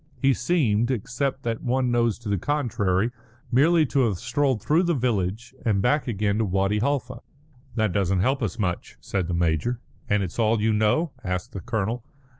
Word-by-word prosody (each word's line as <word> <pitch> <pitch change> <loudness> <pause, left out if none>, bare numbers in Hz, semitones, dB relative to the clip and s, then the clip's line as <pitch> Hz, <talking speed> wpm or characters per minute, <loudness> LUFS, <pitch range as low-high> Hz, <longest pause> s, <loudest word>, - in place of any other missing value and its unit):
He 135 -1 +4
seemed, 120 -5 +1
except 130 +3 -2
that 115 -2 -2
one 125 0 +1
knows 120 -3 +2
to 115 - -10
the 100 -2 0
contrary, 115 - 0 0.4
merely 155 +6 +4
to 140 +1 0
have 105 -5 0
strolled 125 +3 0
through 155 - +2
the 170 -2 +1
village 115 -1 -1
and 105 -4 +2
back 140 +9 +1
again 105 -2 0
to 110 - +2
Wadi 95 +2 +1
Halfa." 140 +4 -1 0.6
"That 110 -5 +1
doesn't 95 -1 +1
help 135 +6 +1
us 110 0 -2
much," 90 -5 -3
said 95 -4 -2
the 90 - -1
major. 85 +8 0 0.3
"And 105 -1 +2
it's 90 +4 -6
all 110 0 +3
you 110 +1 +2
know?" 110 +10 +2
asked 90 -2 -3
the 95 - -5
colonel. 110 +6 -2
115 Hz, 185 wpm, -25 LUFS, 100-130 Hz, 0.6 s, He